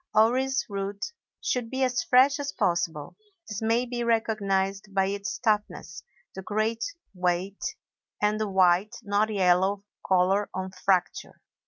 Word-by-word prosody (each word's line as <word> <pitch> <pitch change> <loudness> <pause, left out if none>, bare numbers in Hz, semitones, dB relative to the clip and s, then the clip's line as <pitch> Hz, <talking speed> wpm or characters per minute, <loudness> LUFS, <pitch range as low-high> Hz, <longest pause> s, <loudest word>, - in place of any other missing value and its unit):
Orris 260 +5 +3
root 200 - -4 0.3
should 250 -11 -1
be 265 +1 -1
as 250 -1 +1
fresh 260 +4 +4
as 285 0 -3
possible; 170 -4 -1 0.3
this 210 0 -5
may 230 +2 +2
be 240 -1 -3
recognized 200 -3 0
by 195 -1 +3
its 200 +1 -3
toughness, 210 -6 -1 0.3
the 190 - -7
great 215 +3 -1 0.3
weight, 180 +4 -1 0.6
and 210 +1 +1
the 215 - -1
white, 190 +3 +3
not 205 +1 +1
yellow 190 0 +2 0.2
color 190 +2 +2
on 185 0 -4
fracture. 185 -1 -1
205 Hz, 135 wpm, -27 LUFS, 190-230 Hz, 0.6 s, fresh